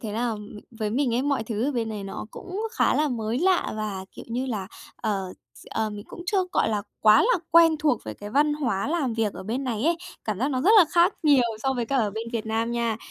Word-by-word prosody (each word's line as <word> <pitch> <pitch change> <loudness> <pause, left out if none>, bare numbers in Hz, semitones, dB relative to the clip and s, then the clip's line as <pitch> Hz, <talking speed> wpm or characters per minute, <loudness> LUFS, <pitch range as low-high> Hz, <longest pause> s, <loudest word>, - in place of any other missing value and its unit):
thế 215 -3 -5
là 230 +1 -1 0.4
với 220 -2 -3
mình 250 -1 +1
ấy, 250 - +1
mọi 280 -3 0
thứ 220 +1 -2
ở 290 - -1
bên 230 -3 -1
này 210 -2 -5
nó 195 - -6
cũng 380 +2 -6
khá - - +2
là 300 0 +2
mới 230 -1 -2
lạ 370 +1 +2
và, 205 -3 -4
kiểu - - -10
như 245 +3 -2
là, 210 -7 -3 0.3
ờ, 195 -4 -2 0.2
s - - -16
ờ, 220 -1 -1
mình 205 0 -8
cũng 345 - -9
chưa, 385 -1 +2
gọi - - +2
là, 210 -2 -1 0.2
quá 215 0 +7
là 480 -3 +3
quen 330 -1 +6
thuộc 295 -6 +1
với 110 -1 -6
cái 205 - -9
văn 295 +4 +3
hóa 260 -8 -1
làm 295 -7 0
việc 220 -3 0
ở - - -8
bên 235 +8 -3
này 235 -1 -2
ấy. 335 +1 +3 0.3
Cảm 210 -3 -2
giác 260 +5 +1
nó 255 - 0
rất 365 - +4
là 365 - +8
khác 345 +1 +4
nhiều 290 -5 +5 0.2
so 265 - +1
với 240 -3 -2
cái 275 - +1
ở 215 -4 +1
bên 220 +3 -5
Việt 225 -2 -3
Nam 225 +1 -1
nha. 235 -2 0
235 Hz, 260 wpm, -25 LUFS, 215-290 Hz, 0.4 s, là